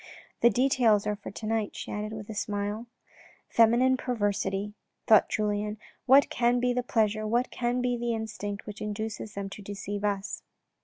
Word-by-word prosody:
" - - -29
The 235 - +7
details 240 -3 +3
are 210 0 0
for 205 - -9
to 215 - -8
night," 220 -1 -1
she - - -6
added 210 +1 -3
with 215 -1 -7
a 220 - -6
smile. 205 +2 -3 0.3
" - - -25
Feminine 240 +3 +5
perversity," 205 -4 -1 0.3
thought 215 -2 +6
Julien, 210 0 -1
" - - -36
What 270 +2 +6
can 240 0 +2
be 250 0 +1
the 250 - 0
pleasure, 215 -3 0
what 240 +3 +1
can 245 +1 -1
be 245 0 +1
the 235 -1 -1
instinct 215 -2 -5
which 210 -1 -8
induces 210 0 -4
them 200 0 -3
to 205 - -8
deceive 205 0 -5
us." 200 -1 -2
215 Hz, 190 wpm, -28 LUFS, 205-240 Hz, 0.3 s, The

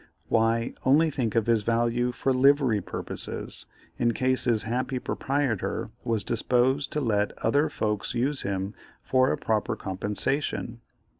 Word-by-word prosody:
Why, 115 +1 +2
only 155 +5 +4
think 120 -6 -2
of 115 -2 +3
his 115 -2 +3
value 120 +2 +1
for 135 +2 0
livery 130 -4 +4
purposes - - -4 0.3
in 120 -1 +2
case 130 0 +1
his 115 -4 +2
happy 125 +4 -2
proprietor 135 -4 -2
was 115 -3 0
disposed 125 +5 +1
to 150 - 0
let 105 -5 0
other 145 +7 +3
folks 105 -3 -2
use 135 +4 0
him 95 +1 -3 0.3
for 130 0 +3
a - - 0
proper 110 -2 0
compensation. 110 +5 -2
120 Hz, 140 wpm, -27 LUFS, 110-130 Hz, 0.3 s, only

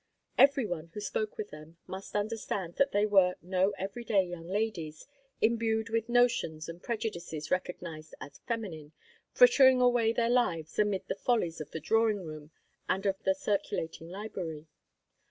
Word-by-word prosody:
Every 275 -2 +5
one 170 -4 -4
who - - -3
spoke 210 +1 -3
with 210 - -5
them 155 +2 -12
must 190 +2 -8
understand 205 -4 -2
that 275 0 +3
they 205 +1 +3
were 190 -3 +4
no 185 +2 +1
every 195 +5 -5
day 200 -4 +3
young 175 -2 -8
ladies, 180 -6 -3 0.4
imbued 225 -1 +1
with 225 0 -1
notions 235 -11 +2
and 170 +1 -8
prejudices 175 -9 -4
recognized 170 -4 -3
as - - -11
feminine, 175 -10 -4 0.4
frittering 270 - +7
away 245 -2 +4
their 230 0 +1
lives 170 -11 0
amid 205 -2 +1
the - - -1
follies 190 -8 0
of 150 - -7
the 160 - -5
drawing 220 0 +2
room 155 -1 -8 0.4
and 190 +2 0
of 195 +1 0
the 285 - +2
circulating 180 - -2
library. 180 -6 -6
200 Hz, 155 wpm, -30 LUFS, 165-225 Hz, 0.4 s, frittering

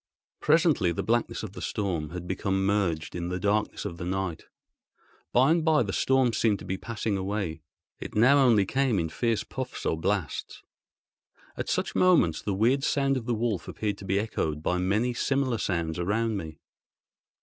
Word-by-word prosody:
Presently 155 - +3
the 85 - -3
blackness 120 0 0
of 105 -3 -6
the - - -8
storm 90 -8 -2
had 90 +1 -7
become 95 +1 -1
merged 95 -6 0
in 85 0 -3
the 90 +1 -2
darkness 105 +3 0
of 85 - -5
the 85 - -6
night. 95 -3 -3 0.8
By 130 +5 +4
and 165 0 +2
by 155 -4 +4
the 100 -3 -4
storm 130 -3 +2
seemed 110 -2 +2
to 90 - -11
be 95 +1 -2
passing 110 0 -3
away: 95 -4 -3 0.4
it - - -8
now 130 +7 +6
only 115 -7 +5
came 130 0 +1
in 80 -2 -1
fierce 115 +5 0
puffs 130 -1 -6
or 80 - 0
blasts. 100 -2 -2 0.9
At - - -4
such - - -1
moments 165 - +3
the 100 - -2
weird 125 +7 +2
sound 140 -1 +1
of 125 -2 -4
the 120 - +1
wolf 110 -4 -2
appeared 105 -2 -3
to 95 - -9
be 95 +1 +1
echoed 80 -8 -2
by 90 +2 0
many 105 +7 +1
similar 130 -1 0
sounds 85 -3 -2
around 110 +5 0
me. 80 -6 -6
105 Hz, 185 wpm, -27 LUFS, 90-120 Hz, 0.9 s, now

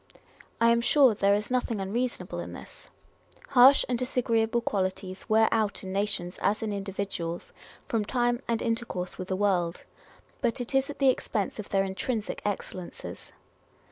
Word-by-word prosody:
I 230 0 +5
am 235 0 +3
sure 260 0 +5
there 200 0 +3
is 210 +3 -3
nothing 245 -3 0
reasonable 230 +6 -2
in - - -6
this. - - -12 0.6
Harsh 265 +2 +7
and 245 -2 -1
dis 255 +1 -4
agreeable 230 -1 +2
qualities 190 -2 -3
wear 220 +1 +5
out 215 -3 0
in 190 0 -5
nations, 195 -3 -1
as 210 +3 +1
in 215 -2 -2
individuals, 195 -4 -4 0.3
from 225 -2 0
time 240 +1 0
and 230 -1 0
intercourse 225 -6 -3
with 185 - -4
the 190 - -1
world; 185 -4 0 0.6
but 240 -2 0
it 245 +2 -5
is 270 +1 +2
at 290 - -6
the 275 -2 +4
expense 215 -5 -1
of 210 - -6
their 195 -2 +2
intrinsic 205 +3 -3
excellences. 185 -3 -6
215 Hz, 165 wpm, -28 LUFS, 195-240 Hz, 0.6 s, Harsh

